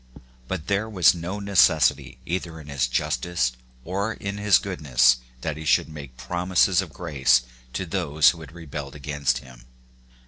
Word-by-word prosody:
But 90 -5 -4
there 100 +2 -1
was 95 -5 +5
no 90 +4 -5
necessity 80 -9 +3
either 85 -2 -4
in 75 -1 -12
his 70 -3 0
justice 65 +2 -1 0.3
or 100 +5 -2
in 100 -1 -6
his 105 -3 +5
goodness 65 - +2 0.2
that 80 +2 -3
he 80 - -7
should 80 - +2
make 70 -5 -10
promises 90 +8 +1
of 90 -5 -8
grace 65 -8 +2 0.3
to 95 - -3
those 80 -4 +3
who 85 - -11
had 80 -2 -11
rebelled 75 -4 -8
against 70 -3 -1
him. 60 -2 -15
80 Hz, 160 wpm, -24 LUFS, 70-95 Hz, 0.3 s, was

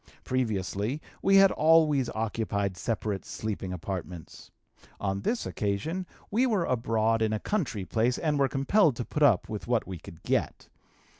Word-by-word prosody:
Previously 110 0 -1 0.2
we 195 0 +4
had 195 0 +7
always 155 -5 +4
occupied 105 -3 -1
separate 105 -1 -2
sleeping 100 -4 -4
apartments; 90 -2 -7 0.5
on 100 -1 -2
this 230 - -1
occasion 155 - -2 0.2
we 245 +5 +3
were 205 -8 +1
abroad 115 -2 +1
in 110 -1 +1
a 110 - -1
country 135 - -2
place, 120 +4 +1
and 150 -3 0
were 135 -1 +3
compelled 140 - +3
to 120 - -4
put 150 - -4
up 125 -11 +4
with 105 0 -6
what 120 -2 +1
we 95 -3 -7
could 80 +1 -13
get. - - -1
115 Hz, 155 wpm, -28 LUFS, 100-150 Hz, 0.5 s, had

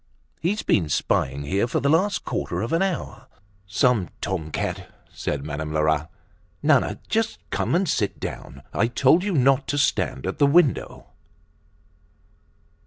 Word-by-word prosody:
He's 195 +6 0
been 85 -7 +2
spying 70 -1 0
here 95 +10 0
for - - 0
the 140 - 0
last 185 +7 +2
quarter - - -2
of 115 - -3
an 165 - +2
hour." 195 -3 -3 0.4
"Some 100 0 +2
tom 90 -6 -3
cat," - - -4 0.2
said 70 -1 -3
Madame 75 0 -4
Lerat. 80 +1 +1 0.5
"Nana, - - +3
just 225 0 0
come - - 0
and 185 +2 +2
sit 105 -9 -1
down! 70 +1 -7
I 115 - +2
told 135 +8 +3
you 205 -1 -1
not 135 -1 +3
to 145 - -1
stand 140 - 0
at 95 - -3
the 145 - +5
window." 145 -1 +2
120 Hz, 150 wpm, -24 LUFS, -, 0.5 s, the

